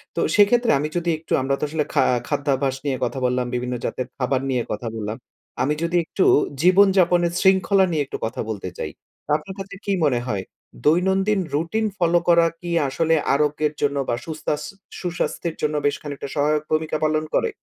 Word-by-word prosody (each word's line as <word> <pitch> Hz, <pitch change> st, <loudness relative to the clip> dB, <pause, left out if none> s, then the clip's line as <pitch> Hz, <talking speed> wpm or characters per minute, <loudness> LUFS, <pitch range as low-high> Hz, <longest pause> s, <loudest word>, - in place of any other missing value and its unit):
তো -, -, -1 dB, 0.2 s
সেক্ষেত্রে 230 Hz, +4 st, +4 dB
আমি 150 Hz, -, -1 dB
যদি 175 Hz, 0 st, -1 dB
একটু 160 Hz, -, -5 dB
আমরা 135 Hz, +1 st, 0 dB
তো -, -, -5 dB
আসলে 155 Hz, -1 st, -1 dB
খা -, -, +4 dB, 0.2 s
খাদ্যাভ্যাস 140 Hz, -2 st, 0 dB
নিয়ে 135 Hz, -2 st, 0 dB
কথা 130 Hz, +2 st, -3 dB
বললাম, 125 Hz, 0 st, +1 dB
বিভিন্ন 125 Hz, 0 st, -2 dB
জাতের 130 Hz, -, -3 dB
খাবার 130 Hz, 0 st, 0 dB
নিয়ে 125 Hz, -2 st, 0 dB
কথা 105 Hz, +3 st, -3 dB
বললাম। 110 Hz, 0 st, -4 dB, 0.5 s
আমি 150 Hz, -, +1 dB
যদি 170 Hz, +1 st, +1 dB
একটু 185 Hz, -, 0 dB, 0.4 s
জীবনযাপনের 180 Hz, -2 st, +4 dB
শৃঙ্খলা 190 Hz, 0 st, +4 dB
নিয়ে 155 Hz, -3 st, +1 dB
একটু -, -, -6 dB
কথা 110 Hz, -, -4 dB
বলতে 100 Hz, -4 st, -4 dB
চাই। 75 Hz, -, -4 dB, 0.3 s
তা -, -, -5 dB
আপনার 170 Hz, +5 st, -10 dB
কাছে 195 Hz, +1 st, -7 dB
কি 200 Hz, -, 0 dB
মনে 125 Hz, -5 st, +2 dB
হয়? 100 Hz, -5 st, -2 dB, 0.4 s
দৈনন্দিন 190 Hz, +6 st, +3 dB, 0.2 s
রুটিন 170 Hz, +9 st, 0 dB
ফলো 175 Hz, -1 st, +3 dB
করা 170 Hz, -1 st, +6 dB
কি 175 Hz, -, -7 dB, 0.2 s
আসলে 165 Hz, +4 st, +1 dB, 0.2 s
আরোগ্যের 150 Hz, +1 st, +1 dB
জন্য 145 Hz, -1 st, +1 dB
বা 120 Hz, -, +2 dB
সুস্তাস 155 Hz, -2 st, -3 dB, 0.4 s
সুস্বাস্থ্যের 175 Hz, -1 st, -3 dB
জন্য 150 Hz, 0 st, 0 dB
বেশ 145 Hz, -, +2 dB
খানিকটা 145 Hz, -1 st, -6 dB
সহায়ক 150 Hz, +1 st, +1 dB
ভূমিকা 155 Hz, 0 st, 0 dB
পালন 155 Hz, 0 st, +1 dB
করে? 465 Hz, -, +2 dB
155 Hz, 180 wpm, -22 LUFS, 135-175 Hz, 0.5 s, করা